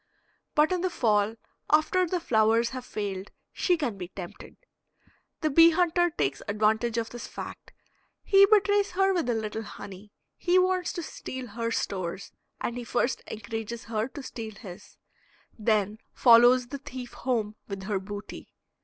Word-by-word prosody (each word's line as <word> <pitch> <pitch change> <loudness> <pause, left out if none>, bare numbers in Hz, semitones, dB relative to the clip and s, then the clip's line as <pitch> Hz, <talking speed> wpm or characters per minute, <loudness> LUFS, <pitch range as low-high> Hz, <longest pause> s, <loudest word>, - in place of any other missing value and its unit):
But 305 +3 +4
in 365 -1 0
the 370 - +1
fall, 215 - +1 0.3
after 330 +4 +3
the 360 +2 -1
flowers 225 -4 +3
have 255 -1 -6
failed, 200 -3 -4 0.2
she 355 -2 +2
can 240 -11 -3
be 180 - -5
tempted. 180 -1 -10 0.8
The 310 - +1
bee 330 +4 +8
hunter 350 +1 +2
takes 140 - -2
advantage 220 +3 +1
of 230 -1 -2
this 240 - -7
fact; - - -8 0.5
he 395 0 +6
betrays 405 -1 +3
her 385 +1 +3
with 340 -9 0
a 240 - +2
little 220 0 -3
honey. 205 -1 -10 0.3
He 355 +1 +2
wants 370 0 +2
to 345 - -4
steal 260 -5 -7
her 230 +2 -3
stores, 185 -5 -3 0.3
and 240 - -3
he - - -5
first 240 +2 0
encourages 225 +1 -5
her 220 +1 -2
to 280 +1 -9
steal 225 -4 -7
his, 180 -6 -12 0.6
then 215 -1 +1 0.2
follows 240 +1 +6
the 280 - -5
thief 255 -2 -8
home 225 -4 -1
with 195 -1 -6
her 195 0 -1
booty. 205 +2 -9
235 Hz, 160 wpm, -27 LUFS, 210-315 Hz, 0.8 s, bee